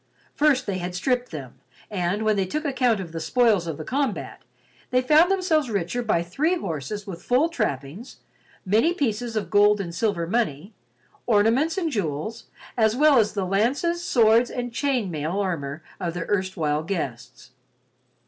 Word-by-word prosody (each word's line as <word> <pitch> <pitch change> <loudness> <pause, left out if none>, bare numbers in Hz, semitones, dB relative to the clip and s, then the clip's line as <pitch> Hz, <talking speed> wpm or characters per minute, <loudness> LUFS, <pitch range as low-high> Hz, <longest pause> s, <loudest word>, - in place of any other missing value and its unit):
First 290 -3 +2
they 190 -2 -2
had 180 0 -5
stripped 250 +6 0
them 130 -5 -9 0.3
and, 190 +2 -1
when 215 -1 +2
they 195 -2 0
took 305 - -3
account 250 -6 +1
of 180 -4 -6
the 165 - -5
spoils 210 -1 +2
of 160 -3 -4
the - - -6
combat, 270 -4 -2 0.5
they 250 - +3
found 310 +6 +5
themselves 345 -8 +1
richer 200 +3 -1
by 215 -8 +1
three 295 - 0
horses 195 - -5
with 180 -4 -8
full 265 +7 +2
trappings, 155 - -4 0.5
many 225 - +2
pieces 235 - -2
of 215 - -3
gold 205 0 +5
and 175 -4 -4
silver 180 -2 0
money, 190 -2 -2 0.5
ornaments 235 - +3
and 335 -4 -1
jewels, 205 - -3 0.3
as 220 -2 +2
well 290 -1 +5
as 210 -1 +1
the 195 -2 -1
lances, 265 - 0
swords 235 -4 +4
and 245 -1 -5
chain 255 -8 0
mail 155 +1 -3
armor 160 -6 -3 0.2
of 170 -1 -3
their 175 - -3
erstwhile 185 -7 0
guests. 130 -8 -5
210 Hz, 165 wpm, -24 LUFS, 175-250 Hz, 0.5 s, found